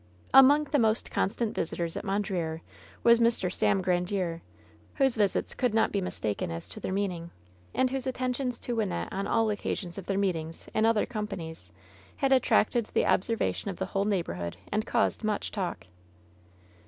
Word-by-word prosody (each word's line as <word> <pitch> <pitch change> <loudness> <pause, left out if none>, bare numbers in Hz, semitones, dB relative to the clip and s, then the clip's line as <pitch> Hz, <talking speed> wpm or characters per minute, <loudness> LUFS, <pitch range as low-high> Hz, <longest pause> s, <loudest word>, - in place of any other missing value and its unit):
Among 280 +3 +8
the 290 0 0
most 220 0 +1
constant 220 +2 0
visitors 165 0 -2
at - - -4
Mondreer 190 -5 -2 0.4
was 235 0 +6
Mr. 230 -6 +2
Sam 190 - +2
Grandiere, 180 -1 0 0.5
whose 270 -3 +2
visits 205 -3 +1
could 245 -4 0
not 225 - +3
be 200 - 0
mistaken 105 - -2
as 85 0 -5
to - - -8
their - - -4
meaning, 185 -4 -2 0.5
and 260 - +3
whose 270 -1 -2
attentions 255 -1 -1
to 240 - -2
Wynnette 210 -5 -1
on 195 +1 -2
all 225 -1 +2
occasions 200 -3 -3
of 190 - -10
their 195 - 0
meetings 165 -5 -2
in 220 +1 +3
other 225 -2 +3
companies 170 - -6 0.4
had 275 -1 0
attracted 245 -3 +3
the - - +1
observation 215 0 0
of 190 - -5
the 190 - -2
whole 195 +1 -1
neighborhood 90 - -2
and 215 +2 -1
caused 235 -1 +1
much 215 -1 -1
talk. 180 - -3
205 Hz, 165 wpm, -29 LUFS, 180-235 Hz, 0.5 s, Among